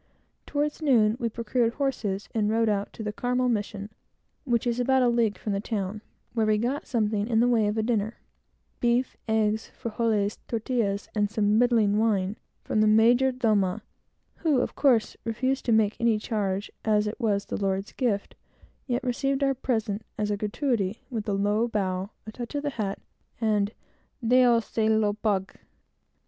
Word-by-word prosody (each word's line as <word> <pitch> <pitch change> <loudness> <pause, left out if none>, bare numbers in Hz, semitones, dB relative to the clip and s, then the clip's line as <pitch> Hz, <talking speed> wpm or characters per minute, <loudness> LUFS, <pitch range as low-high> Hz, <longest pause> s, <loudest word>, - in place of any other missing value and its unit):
Toward 295 +2 -1
noon 230 -7 +4
we 235 -2 0
procured 235 +1 0
horses, 220 -8 -2
and 210 -2 +1
rode 225 0 +2
out 200 -1 -1
to 220 - -7
the 210 -1 -3
Carmel 250 +3 0
mission, 205 -2 -3 0.5
which 240 -3 +1
is 240 0 0
about 260 +1 +3
a - - +4
league 230 -3 +1
from 210 - -3
the 195 - 0
town, 205 -1 -3 0.3
where 225 -2 +1
we 215 0 +3
got 245 +6 -2
something 215 -3 0
in 225 -2 +2
the 240 - +4
way 225 -4 +3
of 210 +2 -1
a 220 - +1
dinner 220 -1 -1 0.6
beef, 240 +2 +1
eggs, 220 0 +1
frijoles, 215 -2 0
tortillas, 220 -3 -1
and 210 -1 +1
some 210 0 +2
middling 225 -4 +3
wine 205 -3 +1 0.3
from 215 - +1
the 215 - +4
mayordomo, 225 -3 +3 0.6
who, 300 -6 +2
of - - -2
course, 245 -6 +2
refused 260 +4 -1
to 235 - +1
make 220 -1 +3
any 230 -2 +3
charge, 205 -3 -2
as 210 -1 +2
it 210 +4 -4
was 205 -4 0
the - - -4
Lord's 195 +1 -1
gift, 220 -6 -1 0.5
yet 245 0 -1
received 270 +2 0
our 275 0 +3
present, 220 -5 -2
as 210 0 -1
a - - +1
gratuity, 210 -1 -1
with 220 -3 -3
a - - +1
low 205 +4 +1
bow, 190 -3 -2 0.2
a 215 - -7
touch 240 +4 -7
of 290 - -1
the 290 - -1
hat, 205 -6 -3 0.4
and 210 -2 +1 0.6
"Dios 245 -2 +5
se 220 -1 0
lo 220 -1 +3
pague!" 205 -3 -1
220 Hz, 175 wpm, -26 LUFS, 210-240 Hz, 0.6 s, Dios